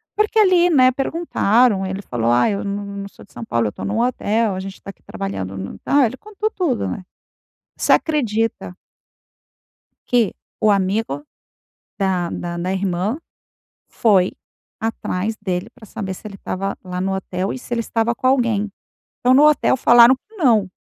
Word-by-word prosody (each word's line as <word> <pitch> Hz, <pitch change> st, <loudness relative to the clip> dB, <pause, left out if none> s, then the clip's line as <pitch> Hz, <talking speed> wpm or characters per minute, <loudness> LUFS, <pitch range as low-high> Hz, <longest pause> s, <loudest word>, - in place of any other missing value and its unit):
porque 425 Hz, +1 st, +2 dB
ali, 365 Hz, -4 st, +5 dB
né, 260 Hz, -6 st, +5 dB
perguntaram, 250 Hz, -, +1 dB
ele 190 Hz, +1 st, -4 dB
falou: 120 Hz, -, -1 dB
"Ah, 120 Hz, -, +4 dB
eu 200 Hz, -1 st, -2 dB
não 200 Hz, 0 st, -3 dB
não 200 Hz, 0 st, -6 dB
sou -, -, -16 dB
de -, -, -26 dB
São -, -, -7 dB
Paulo, 115 Hz, -, 0 dB
eu -, -, -1 dB
estou -, -, -9 dB
num 215 Hz, +3 st, -1 dB
hotel, 225 Hz, -4 st, +1 dB
a -, -, -4 dB
gente 195 Hz, 0 st, -7 dB
está 195 Hz, -, -10 dB
aqui -, -, -29 dB
trabalhando 100 Hz, -, -5 dB
no", 95 Hz, +1 st, -6 dB
ah, 280 Hz, -2 st, +4 dB
ele 235 Hz, -, -2 dB
contou 425 Hz, +1 st, -4 dB
tudo, 325 Hz, -, -1 dB
né. 190 Hz, -, -5 dB, 0.7 s
Você -, -, +3 dB
acredita 225 Hz, -, 0 dB, 1.3 s
que 245 Hz, -1 st, +4 dB, 0.4 s
o 215 Hz, -, +5 dB
amigo 195 Hz, -4 st, 0 dB, 0.8 s
da 185 Hz, -3 st, 0 dB
da 175 Hz, 0 st, -5 dB
da 180 Hz, +2 st, -2 dB
irmã 190 Hz, -, -1 dB, 0.7 s
foi 195 Hz, -5 st, +3 dB, 0.5 s
atrás 220 Hz, -1 st, -2 dB
dele 190 Hz, 0 st, -3 dB
pra 245 Hz, -4 st, -15 dB
saber 190 Hz, -1 st, -5 dB
se 200 Hz, -, -12 dB
ele 205 Hz, -, -8 dB
estava 195 Hz, +1 st, -4 dB
lá 180 Hz, -1 st, -5 dB
no 190 Hz, +1 st, -1 dB
hotel 190 Hz, 0 st, -3 dB
e -, -, -5 dB
se 245 Hz, -1 st, -5 dB
ele 230 Hz, -, -1 dB
estava 230 Hz, +1 st, 0 dB
com 255 Hz, -, -3 dB
alguém, 235 Hz, -6 st, +2 dB, 0.5 s
então 250 Hz, +1 st, +3 dB
no 280 Hz, +3 st, +6 dB
hotel 300 Hz, -, +2 dB
falaram 240 Hz, 0 st, +7 dB
que 445 Hz, -, -19 dB
não 230 Hz, -, +3 dB
210 Hz, 175 wpm, -20 LUFS, 190-250 Hz, 1.3 s, falaram